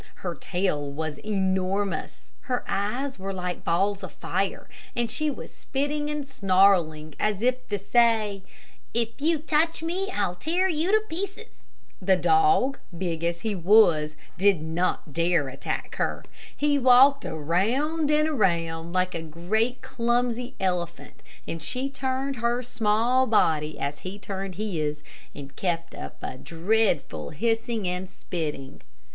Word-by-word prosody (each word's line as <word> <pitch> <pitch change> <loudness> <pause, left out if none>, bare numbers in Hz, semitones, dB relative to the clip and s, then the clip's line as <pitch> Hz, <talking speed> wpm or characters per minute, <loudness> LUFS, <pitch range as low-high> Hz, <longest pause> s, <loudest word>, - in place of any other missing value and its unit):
Her 175 - -1
tail 170 -7 -1
was 155 +1 -4
enormous. 195 -1 -1
Her 250 -2 -1
eyes 240 +6 -2
were 195 +1 -3
like 180 -2 -4
balls 195 +4 +1
of - - -7
fire, - - -2 0.3
and 235 -1 0
she 310 0 0
was 280 - -7
spitting 290 +2 -2
and 300 -2 -3
snarling, 185 - +3
as 210 0 0
if 255 +1 +1
to 205 - 0
say, 215 -1 +2 0.5
"If 230 -1 +1
you 325 +2 +3
touch 320 +2 +1
me, 370 +4 -1
I'll 200 - -1
tear 340 - +1
you 335 +1 0
to 435 0 +3
pieces!" 395 +5 -7 0.3
The 190 0 +4
dog, 390 - +3 0.2
big 170 -2 -2
as 170 0 -1
he 220 -2 -1
was, 170 -5 +4 0.2
did 195 -3 +4
not 160 -1 -2
dare 165 -3 +2
attack 135 +1 -4
her. - - -1 0.3
He 290 -1 +2
walked 265 +2 +6
around 230 - 0
and 305 +1 +3
around, 170 - 0
like 185 0 +1
a 165 - -3
great 195 +10 -1
clumsy 245 +1 0
elephant, 180 -3 -3 0.3
and 165 - -4
she 255 +11 -3
turned 265 0 -2
her 240 +1 0
small 235 +2 +2
body 155 -8 +2
as 140 +1 -3
he 185 +2 -7
turned 195 -2 -5
his, 155 -7 -2 0.3
and 140 -1 -9
kept 170 -2 -2
up - - -8
a 130 - -5
dreadful 170 - 0
hissing 225 - -1
and 180 +1 -3
spitting. 150 -8 -5
200 Hz, 140 wpm, -26 LUFS, 170-260 Hz, 0.5 s, walked